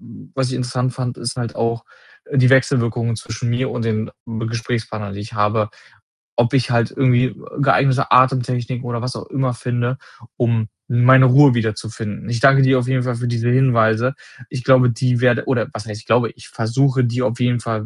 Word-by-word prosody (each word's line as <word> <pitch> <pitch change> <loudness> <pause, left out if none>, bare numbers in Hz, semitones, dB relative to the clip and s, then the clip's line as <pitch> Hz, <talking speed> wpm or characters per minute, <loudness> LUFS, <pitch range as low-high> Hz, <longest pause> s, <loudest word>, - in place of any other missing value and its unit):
hm, - - -14
was 130 -2 0
ich 130 - -4
interessant 125 0 -2
fand, 125 -1 -4
ist 120 +1 -4
halt 120 -2 -4
auch, 115 0 -2 0.4
äh, 140 - -2
die 125 -1 +5
Wechselwirkungen 120 -3 +1
zwischen 110 +2 -5
mir 130 +3 -1
und 120 - -4
den 110 0 -2 0.2
m 115 -2 -5
Gesprächspartnern, 115 -3 -4
die 100 - -7
ich 115 +3 -9
habe, 105 0 +1 0.7
ob 120 +2 +1
ich 130 0 +1
halt 115 -1 +1
irgendwie, 130 -2 +3
äh, 130 - -4 0.3
geeignete 135 0 +2
Atemtechniken 125 -1 +2
oder 120 -1 -3
was 125 0 -4
auch - - -8
immer 135 -3 -1
finde, 120 +1 -2 0.4
um 115 -2 0 0.2
meine 130 +1 +5
Ruhe 135 +1 +6
wiederzufinden. 110 -2 -4
Ich 120 -1 -2
danke 135 +2 +5
dir 130 0 +4
auf 125 - -3
jeden 130 -1 0
Fall 125 -1 -2
für 125 +1 -3
diese 120 0 -1
Hinweise. 125 -1 +2 0.3
Ich 130 -3 -6
glaube, 125 0 +5
die 120 +1 0
werde 125 -2 +2
oder 130 -3 0
was 115 -1 -7
heißt, 105 -1 -7
ich - - -23
glaube, 115 0 +2
ich - - -15
versuche 130 +3 0
die 120 +1 -1
auf 120 -1 -1
jeden 125 -1 +1
Fall 110 -2 -4
120 Hz, 200 wpm, -19 LUFS, 115-130 Hz, 0.7 s, Ruhe